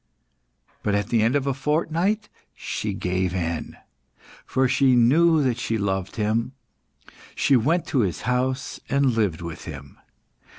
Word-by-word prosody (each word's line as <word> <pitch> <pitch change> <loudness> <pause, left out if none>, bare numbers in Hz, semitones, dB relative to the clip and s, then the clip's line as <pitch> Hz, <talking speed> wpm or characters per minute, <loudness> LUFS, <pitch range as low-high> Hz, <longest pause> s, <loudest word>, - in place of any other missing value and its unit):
But 100 - 0
at 100 0 -1
the 115 -2 +2
end 115 +5 +2
of 140 -1 +1
a 140 - +1
fortnight 165 - 0 0.3
she - - -4
gave 90 0 -1
in, 85 -2 -3 0.7
for 130 0 +2
she 130 0 +3
knew 155 +6 +4
that 125 -3 0
she 115 -2 -1
loved 95 -2 -2
him; 115 +4 -1 0.8
she 140 - +3
went 155 +9 +2
to 135 - +1
his 95 -7 0
house 130 +1 -1
and 140 -1 +3
lived 100 -8 0
with 85 -2 -7
him. 70 -4 -10
120 Hz, 145 wpm, -24 LUFS, 100-140 Hz, 0.8 s, knew